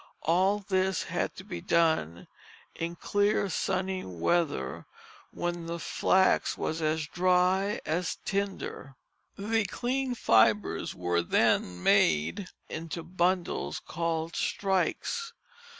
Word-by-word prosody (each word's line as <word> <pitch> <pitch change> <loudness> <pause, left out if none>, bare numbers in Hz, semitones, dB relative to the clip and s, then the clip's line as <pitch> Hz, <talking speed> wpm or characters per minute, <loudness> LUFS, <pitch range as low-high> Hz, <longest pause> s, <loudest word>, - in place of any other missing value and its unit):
All 185 +5 +3
this 190 -2 +1
had - - -2
to - - -9
be 85 - -6
done 160 - +1 0.5
in 170 +1 -4
clear 205 +1 +1
sunny 185 +1 -1
weather 145 - -1 0.4
when 175 -1 -4
the 170 0 -3
flax 190 +3 +2
was 160 +1 -2
as 155 0 0
dry 185 +4 +2
as 175 +3 -1
tinder. 195 -8 -3 0.4
The 225 +2 +1
clean 255 +5 -2
fibres 110 - +2
were 90 -1 0
then 90 +1 +1
made 80 - +3 0.2
into 165 +1 -5
bundles 175 - -1
called 165 0 -3
strikes. 205 - -1
175 Hz, 105 wpm, -29 LUFS, 155-190 Hz, 0.5 s, All